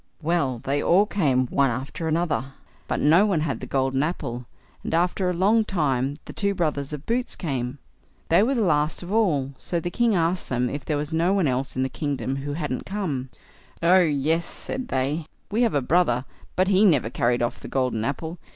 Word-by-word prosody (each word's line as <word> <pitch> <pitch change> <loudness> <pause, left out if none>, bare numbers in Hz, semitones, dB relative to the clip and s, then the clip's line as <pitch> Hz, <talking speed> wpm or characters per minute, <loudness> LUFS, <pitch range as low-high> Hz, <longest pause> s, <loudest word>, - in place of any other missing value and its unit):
Well, 155 -6 +1
they 140 +2 0
all 190 +4 +4
came 140 -12 +1
one 140 -1 +3
after 135 +7 -4
another, 155 -6 -1 0.3
but - - -1
no 165 +6 +5
one 180 -7 +1
had 145 -4 -2
the - - -7
golden 135 0 +1
apple, 135 -7 -3 0.4
and - - -1
after 180 +2 +1
a - - +1
long 205 +6 +3
time 145 -8 0
the - - -9
two 200 0 0
brothers 150 -5 -1
of 150 -1 -6
Boots 245 +2 -1
came. 130 -5 -3 0.5
They 170 - +5
were 260 +6 +2
the 235 - +1
last 150 -2 +1
of 175 - -7
all, 155 -12 +2
so 170 - -1
the 175 +2 -4
king 235 +1 +2
asked 170 +1 0
them 125 -1 0
if 145 0 -4
there 150 - 0
was 150 +2 -4
no 170 +4 +2
one 195 -6 +2
else 130 +1 -1
in 130 - +1
the - - +1
kingdom 135 -2 -3
who 145 +1 -4
hadn't 150 -5 -3
come. 160 -11 -3 0.5
"Oh, 180 +3 +6
yes", 160 +1 +1
said 260 -1 -5
they; 145 +4 -1 0.2
"we 220 +4 +1
have 230 -8 +2
a 140 - +1
brother, 130 -5 +2 0.3
but 185 +1 +2
he 195 +1 +4
never 145 - +3
carried 120 0 +1
off 120 - -2
the - - -9
golden 125 -4 0
apple. 160 +7 -3
150 Hz, 205 wpm, -24 LUFS, 135-180 Hz, 0.5 s, Oh